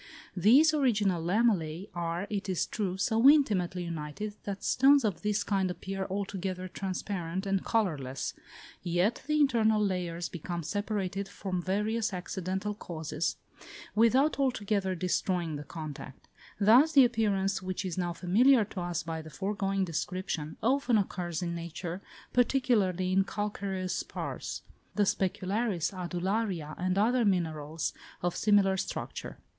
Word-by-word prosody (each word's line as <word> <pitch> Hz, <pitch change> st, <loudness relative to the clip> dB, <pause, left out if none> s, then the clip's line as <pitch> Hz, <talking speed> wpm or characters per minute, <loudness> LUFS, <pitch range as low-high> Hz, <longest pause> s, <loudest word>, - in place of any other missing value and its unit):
These 255 Hz, -, +6 dB
original 210 Hz, -, +2 dB
lamellæ 185 Hz, -3 st, +1 dB
are, 170 Hz, +2 st, -2 dB
it 200 Hz, -1 st, -2 dB
is 185 Hz, -, +1 dB
true, 190 Hz, -4 st, -3 dB
so 225 Hz, +6 st, +5 dB
intimately 190 Hz, -, +3 dB
united, 170 Hz, +5 st, -5 dB
that 200 Hz, -1 st, -5 dB
stones 275 Hz, +1 st, +5 dB
of 200 Hz, -5 st, -1 dB
this 210 Hz, -1 st, 0 dB
kind 195 Hz, -2 st, 0 dB
appear 190 Hz, +1 st, -4 dB
altogether 190 Hz, -1 st, -3 dB
transparent 185 Hz, -1 st, -4 dB
and 195 Hz, -1 st, 0 dB
colourless, 150 Hz, -, -1 dB, 0.5 s
yet, 180 Hz, +6 st, +1 dB
the 305 Hz, 0 st, +2 dB
internal 225 Hz, -6 st, +4 dB
layers 175 Hz, -4 st, -1 dB
become 175 Hz, 0 st, -5 dB
separated, 200 Hz, +1 st, -2 dB
from 185 Hz, -3 st, -3 dB
various 210 Hz, +4 st, 0 dB
accidental 190 Hz, +2 st, -3 dB
causes, 160 Hz, -5 st, -3 dB, 0.6 s
without 255 Hz, +7 st, +3 dB
altogether 205 Hz, -8 st, 0 dB
destroying 175 Hz, -2 st, -1 dB
the 145 Hz, -, -5 dB
contact: 150 Hz, -4 st, -8 dB, 0.3 s
thus 245 Hz, +10 st, +6 dB
the 275 Hz, -4 st, +8 dB
appearance, 205 Hz, -5 st, +1 dB
which 185 Hz, +1 st, -3 dB
is 180 Hz, -3 st, -3 dB
now 175 Hz, -1 st, -1 dB
familiar 215 Hz, +8 st, +4 dB
to 190 Hz, -2 st, -6 dB
us 175 Hz, -1 st, -2 dB
by 165 Hz, 0 st, -4 dB
the 160 Hz, -, -10 dB
foregoing 195 Hz, +1 st, -1 dB
description, 165 Hz, -2 st, -3 dB
often 255 Hz, -1 st, +3 dB
occurs 180 Hz, -4 st, -2 dB
in 170 Hz, -1 st, -2 dB
nature, 170 Hz, +2 st, -5 dB, 0.3 s
particularly 215 Hz, -8 st, +2 dB
in 195 Hz, +1 st, +4 dB
calcareous 195 Hz, -2 st, -3 dB
spars; -, -, -5 dB, 0.3 s
the 210 Hz, -, +3 dB
specularis, 195 Hz, 0 st, 0 dB
adularia, 180 Hz, -2 st, -2 dB
and 185 Hz, +1 st, 0 dB
other 240 Hz, +4 st, +3 dB
minerals 160 Hz, -5 st, -1 dB, 0.3 s
of 175 Hz, -1 st, 0 dB
similar 205 Hz, -2 st, +4 dB
structure. -, -, -5 dB
190 Hz, 130 wpm, -30 LUFS, 175-210 Hz, 0.6 s, the